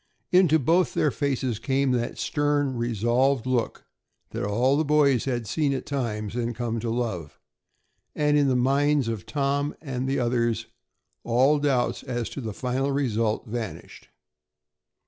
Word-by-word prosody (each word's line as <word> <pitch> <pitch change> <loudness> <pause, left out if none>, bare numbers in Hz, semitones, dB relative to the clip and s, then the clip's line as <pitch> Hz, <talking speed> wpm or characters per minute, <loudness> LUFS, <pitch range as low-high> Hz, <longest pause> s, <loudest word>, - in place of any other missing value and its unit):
Into 180 -4 +5
both 165 +5 +2
their 150 - +2
faces 130 -6 -1
came 135 +2 +1
that 120 -1 -1
stern, 145 -3 0
resolved 120 +3 +1
look 130 -2 -1 0.5
that - - -4
all 120 +7 +2
the 155 - +2
boys 145 -4 +3
had 120 -3 -2
seen 140 +6 0
at 130 - -4
times 110 -6 -3
and 120 -1 -2
come 115 0 -2
to 115 +1 -3
love, 110 -10 -3 0.8
and 150 0 +2
in 145 -1 +4
the 130 - +2
minds 140 +1 +2
of 110 -6 -4
Tom 140 0 -1
and 130 -3 -4
the 135 - 0
others 120 -2 0 0.6
all 130 +5 +3
doubts 135 -4 0
as 120 -3 -3
to 140 - -6
the 110 -3 -4
final 130 +5 -1
result 115 -6 0
vanished. 110 -8 -7
130 Hz, 150 wpm, -25 LUFS, 115-140 Hz, 0.8 s, Into